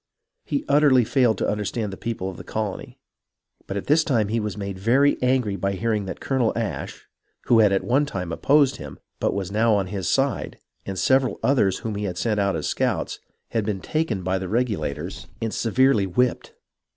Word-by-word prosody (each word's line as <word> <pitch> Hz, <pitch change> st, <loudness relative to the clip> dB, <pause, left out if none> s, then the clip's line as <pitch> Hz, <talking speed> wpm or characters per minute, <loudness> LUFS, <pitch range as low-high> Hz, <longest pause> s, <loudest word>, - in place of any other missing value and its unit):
He 285 Hz, +2 st, -2 dB
utterly 140 Hz, -4 st, +5 dB
failed 120 Hz, -2 st, +2 dB
to -, -, -1 dB
understand 105 Hz, 0 st, -2 dB
the -, -, -5 dB
people 110 Hz, -3 st, -4 dB
of 95 Hz, -, -6 dB
the -, -, -9 dB
colony, 105 Hz, -3 st, -4 dB, 0.7 s
but 100 Hz, -, -3 dB
at 100 Hz, -, -4 dB
this 155 Hz, +2 st, +4 dB
time 115 Hz, -9 st, +1 dB
he 115 Hz, +2 st, 0 dB
was 105 Hz, -2 st, -4 dB
made 100 Hz, -2 st, -5 dB
very 130 Hz, +8 st, +3 dB
angry 125 Hz, -5 st, +1 dB
by 100 Hz, +1 st, -1 dB
hear 115 Hz, +4 st, -1 dB
ing 105 Hz, -2 st, -1 dB
that 95 Hz, -, -6 dB
Colonel 130 Hz, -4 st, +1 dB
Ashe, 115 Hz, -3 st, -4 dB, 0.4 s
who 115 Hz, -, +5 dB
had 105 Hz, -3 st, +5 dB
at 100 Hz, -, +1 dB
one 140 Hz, +4 st, +2 dB
time 90 Hz, -, -4 dB
opposed 140 Hz, -, +3 dB
him, -, -, -9 dB, 0.2 s
but -, -, 0 dB
was 100 Hz, -2 st, -3 dB
now 110 Hz, +1 st, +3 dB
on 100 Hz, -2 st, +1 dB
his 95 Hz, -1 st, -3 dB
side, 135 Hz, 0 st, 0 dB, 0.3 s
and 95 Hz, -1 st, -4 dB
several 130 Hz, +5 st, +2 dB
others 120 Hz, -9 st, +3 dB
whom 110 Hz, -, -2 dB
he 105 Hz, 0 st, -3 dB
had 90 Hz, -3 st, -4 dB
sent 105 Hz, +2 st, 0 dB
out 100 Hz, -2 st, +1 dB
as 75 Hz, -, -3 dB
scouts, -, -, -1 dB, 0.3 s
had 115 Hz, -, -1 dB
been 100 Hz, -2 st, -2 dB
taken 115 Hz, -, -2 dB
by 95 Hz, +1 st, 0 dB
the 95 Hz, -1 st, -5 dB
Regulators 105 Hz, -, -2 dB
and 115 Hz, -1 st, -3 dB
severely 115 Hz, -3 st, +2 dB
whipped. 125 Hz, +7 st, 0 dB
110 Hz, 200 wpm, -23 LUFS, 100-125 Hz, 0.7 s, utterly